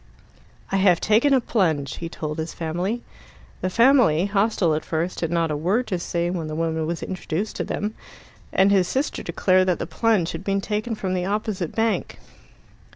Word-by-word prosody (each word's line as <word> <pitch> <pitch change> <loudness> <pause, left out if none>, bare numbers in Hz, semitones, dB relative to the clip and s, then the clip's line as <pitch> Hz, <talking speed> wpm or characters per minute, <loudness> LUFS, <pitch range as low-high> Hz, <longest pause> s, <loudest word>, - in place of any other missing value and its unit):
"I 195 - +2
have 190 -3 +4
taken 225 +7 +3
a 270 - +5
plunge," 160 - 0
he 170 - -5
told 155 -2 -5
his 160 +1 -4
family. 180 +8 -2 0.6
The 185 - 0
family, 230 - +4
hostile 200 -4 +1
at 155 - -1
first, 165 +3 -2
had 165 - 0
not 165 -1 0
a - - 0
word 190 +11 +1
to 185 -4 -1
say 170 0 -1
when 170 -4 -3
the 155 - -5
woman 160 -1 -1
was 170 0 -3
introduced 185 +2 -3
to - - -1
them; 210 +1 -3 0.6
and 195 +1 +4
his 190 -3 +3
sister 270 +9 -1
declared 185 0 +2
that 180 - +2
the - - -3
plunge 215 -7 +1
had - - -6
been 195 0 0
taken 215 +3 -2
from 190 -3 -3
the 180 -1 -1
opposite 200 -3 -2
bank. 225 0 0
185 Hz, 190 wpm, -23 LUFS, 165-210 Hz, 0.6 s, a